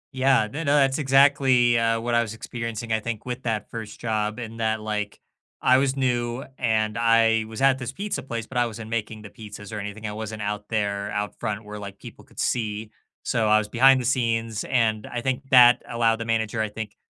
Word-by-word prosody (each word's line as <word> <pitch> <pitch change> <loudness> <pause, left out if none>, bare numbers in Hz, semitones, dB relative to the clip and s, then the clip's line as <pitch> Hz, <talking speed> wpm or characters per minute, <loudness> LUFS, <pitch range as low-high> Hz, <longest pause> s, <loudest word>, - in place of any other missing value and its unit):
Yeah, 130 -2 +3
n 105 - -6 0.2
no 145 - +4
that's 135 0 +3
exactly, 135 -3 +4
uh, 115 0 +1
what 120 +1 -2
I 120 - +4
was 115 -1 -4
experiencing, 115 -1 -5
I 110 - +2
think, 115 -1 -5
with 125 0 -4
that 110 -3 -3
1st 110 -2 -7
job 110 -1 -1
in 115 -1 -7
that, 110 -1 0
like, 105 -1 -4 0.4
I 130 +1 +4
was 135 0 +1
new 120 -1 -1 0.2
and 110 -2 0
I 115 -1 +3
was 110 +3 -7
at 135 0 +4
this 125 0 -4
pizza 200 +9 -4
place, 115 -3 -5
but 125 - -7
I 120 -1 +3
wasn't 110 0 -8
making 110 -1 -3
the 105 - -9
pizzas 105 -1 -9
or 105 - -3
anything; 105 +2 -7
I 105 - -3
wasn't 110 -1 -6
out 105 0 -4
there, 100 -2 -1
out 105 0 -4
front, 105 0 -3
where, 105 0 -8
like, 100 -1 -8
people - - -12
could - - -15
see, 110 -2 -2 0.3
so 115 -2 0
I 110 0 +5
was 105 -1 -1
behind 130 +3 +5
the 125 - -4
scenes 115 -3 0
and, 110 -4 0
I 120 -1 -4
think, 135 +2 -3
that 125 -2 +7
allowed 115 -1 +2
the 115 - -5
manager, 110 0 -1
I 110 - -1
think, 105 0 -7
115 Hz, 220 wpm, -24 LUFS, 110-125 Hz, 0.4 s, that